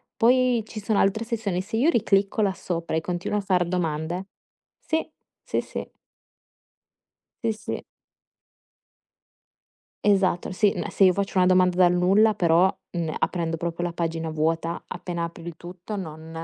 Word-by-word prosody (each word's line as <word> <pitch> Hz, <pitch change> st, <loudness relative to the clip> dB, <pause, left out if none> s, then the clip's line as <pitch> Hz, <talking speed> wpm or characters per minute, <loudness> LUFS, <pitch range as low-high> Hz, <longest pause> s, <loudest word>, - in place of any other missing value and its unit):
Poi 245 Hz, -1 st, +3 dB
ci 220 Hz, -1 st, -7 dB
sono 205 Hz, 0 st, +1 dB
altre 220 Hz, +4 st, +2 dB
sezioni, 215 Hz, -6 st, -2 dB
se 225 Hz, +4 st, -6 dB
io 275 Hz, +9 st, +3 dB
riclicco 200 Hz, -5 st, +2 dB
là 195 Hz, -2 st, +2 dB
sopra 170 Hz, -3 st, -3 dB
e 160 Hz, -, +1 dB
continuo 180 Hz, +4 st, -2 dB
a -, -, -3 dB
far 185 Hz, -3 st, +1 dB
domande 175 Hz, +1 st, -2 dB, 0.5 s
sì, 320 Hz, 0 st, -1 dB, 0.4 s
sì, -, -, -1 dB
sì. -, -, -6 dB, 1.6 s
Sì, 225 Hz, -1 st, +1 dB
sì. 215 Hz, -, -6 dB, 2.2 s
Esatto. 195 Hz, -4 st, +2 dB
Sì, 200 Hz, +2 st, +3 dB
ma 210 Hz, -, -3 dB
se 195 Hz, -, +3 dB
io 185 Hz, -, +6 dB
faccio 195 Hz, 0 st, -3 dB
una 180 Hz, -, +5 dB
domanda 180 Hz, -1 st, +4 dB
dal 180 Hz, -1 st, +5 dB
nulla, 195 Hz, +5 st, +4 dB
però, 175 Hz, 0 st, +3 dB, 0.2 s
uhm, 165 Hz, -3 st, -2 dB
aprendo 165 Hz, -2 st, -1 dB
proprio 170 Hz, +1 st, -3 dB
la 170 Hz, -, -4 dB
pagina 165 Hz, -1 st, -2 dB
vuota 165 Hz, +2 st, -1 dB
appena 170 Hz, -2 st, -4 dB
apri 170 Hz, 0 st, -7 dB
il 170 Hz, -2 st, -6 dB
tutto 180 Hz, +5 st, -7 dB
non 160 Hz, -3 st, -7 dB
180 Hz, 155 wpm, -25 LUFS, 170-205 Hz, 2.2 s, io